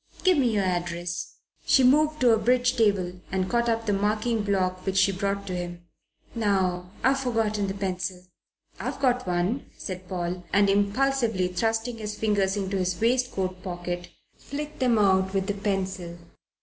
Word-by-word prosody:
Give 370 -1 +5
me 250 -3 +3
your 205 -2 +1
address." 175 -1 -3 0.3
She 265 - +4
moved 305 +3 +4
to 245 -2 +6
a - - +4
bridge 250 +3 +2
table 190 -5 +1
and 185 -1 0
caught 235 +1 +1
up 225 0 0
the 205 - +1
marking 215 +3 0
block, 185 -2 0
which 195 0 -1
she 190 +1 +5
brought 200 +1 -2
to 185 -2 -4
him. 175 -1 -5 0.5
"Now 190 -5 0
I've 270 +2 +3
forgotten 220 -5 0
the 195 - -3
pencil." 185 -2 -3 0.6
"I've - - -4
got 250 -4 +1
one," 180 +9 -1
said 185 -1 -6
Paul, 180 0 -3
and 200 0 +4
impulsively 215 -1 +1
thrusting 225 +5 -1
his 210 -1 -4
fingers 205 -2 +1
into 195 0 -2
his 180 -2 -1
waistcoat 225 -6 0
pocket, 175 -1 -5 0.3
flicked 300 +2 -7
them 250 -3 +3
out 190 -1 +3
with 190 -1 +1
the 205 - -1
pencil. 190 -3 -3
200 Hz, 165 wpm, -26 LUFS, 185-230 Hz, 0.6 s, to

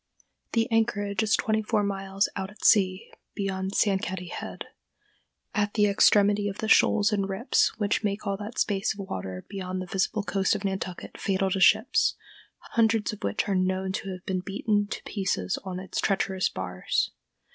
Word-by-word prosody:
The 230 0 +2
anchorage 205 -3 +1
is 220 0 +3
twenty 220 0 0
four 215 -1 0
miles 195 0 0
out 190 -1 -3
at 210 -1 -10
sea 190 -2 +3 0.2
beyond 190 -1 -2
Sankaty 190 -3 0
head, - - -6 0.9
at 205 -2 0
the 210 -2 +4
extremity 205 0 +4
of 195 - -7
the 220 - -3
shoals 215 -1 +4
and 200 -1 0
rips 195 +7 +1
which 205 0 0
make 205 +1 -2
all 200 -1 0
that 210 +3 -8
space 200 +1 0
of 200 -1 -7
water 95 - -5
beyond 185 -2 -4
the 185 - -4
visible 195 +3 -1
coast 195 0 +1
of 205 -1 -4
Nantucket 190 -2 -4
fatal 195 -1 0
to 195 - 0
ships, - - +4 0.6
hundreds 225 -2 +2
of 210 - -9
which 100 0 -1
are 200 - +1
known 185 0 0
to 195 +1 -4
have 185 -1 -7
been 185 -1 -1
beaten 205 +2 0
to - - -6
pieces 190 - -2
on 185 -1 -5
its 190 - -3
treacherous 190 -1 +1
bars. 90 -1 -2
195 Hz, 175 wpm, -27 LUFS, 190-210 Hz, 0.9 s, the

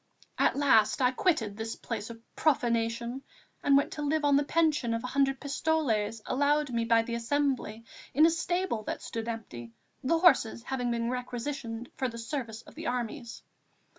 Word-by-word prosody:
At - - +3
last 260 -7 +4
I 250 -1 +4
quitted 255 - 0
this 225 +1 -4
place 220 -2 -5
of 230 -1 -9 0.2
profanation 235 -3 0 0.4
and 280 -1 +5
went 280 - +1
to 300 - -5
live 295 +1 +1
on 285 -1 +5
the 285 - +4
pension 295 -6 +1
of 230 - -4
a 250 - -5
hundred 270 -1 +2
pistoles 240 -8 0
allowed 290 +1 +1
me 230 -1 0
by 230 0 +4
the 235 - -5
Assembly 235 -2 -1 0.3
in 305 +4 +5
a 330 - +5
stable 350 -6 -1
that - - -4
stood 225 0 -5
empty, 120 - -6 0.3
the 330 +6 +2
horses 270 -10 +4
having 250 -2 -2
been 235 0 -1
requisitioned 245 -1 -4
for 260 - 0
the 230 -1 -7
service 230 -2 -5
of - - -15
the - - -6
armies. 240 -1 -4
245 Hz, 175 wpm, -29 LUFS, 230-285 Hz, 0.4 s, and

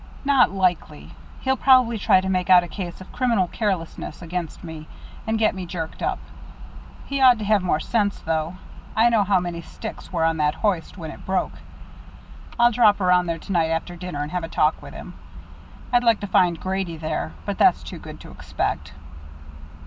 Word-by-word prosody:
"Not 275 -3 +5
likely. 180 -5 -1 0.3
He'll 265 0 +1
probably 255 -4 +4
try 190 -1 +4
to 190 - -4
make 185 -1 -1
out 180 -1 +7
a - - -6
case 180 -1 -7
of 185 - -12
criminal 235 -7 +1
carelessness 190 -5 -3
against 170 -1 -5
me, 160 -2 -8 0.4
and 220 0 +1
get 220 -1 +2
me 185 -2 -6
jerked 165 -2 -6
up. - - -1 0.9
He 275 -1 -3
ought 250 -2 +7
to 215 - -5
have 210 -1 +3
more 175 -4 0
sense, 205 +3 0
though. 160 +1 -2 0.4
I 230 +2 +5
know 225 -3 +3
how 195 -1 +2
many 175 -1 -4
sticks - - -9
were 165 -3 +1
on 165 0 +1
that 150 0 +1
hoist 190 -2 -1
when 160 -3 -6
it - - -12
broke. 190 0 -1 1.1
I'll 240 0 +5
drop 215 -3 +4
around 180 -1 +3
there 165 -1 -1
to 195 - -9
night 165 -3 +2
after 165 +2 -2
dinner 175 -4 -5
and 150 - -6
have 180 -1 -2
a - - -3
talk 155 -1 +1
with - - -11
him. - - -9 0.8
I'd 245 0 +4
like 230 -3 +4
to - - -3
find 175 -3 +2
Grady 190 -3 -3
there 155 - -3
but - - -4
that's - - +4
too - - -8
good - - -10
to - - -12
expect." - - -4
185 Hz, 195 wpm, -23 LUFS, 165-215 Hz, 1.1 s, out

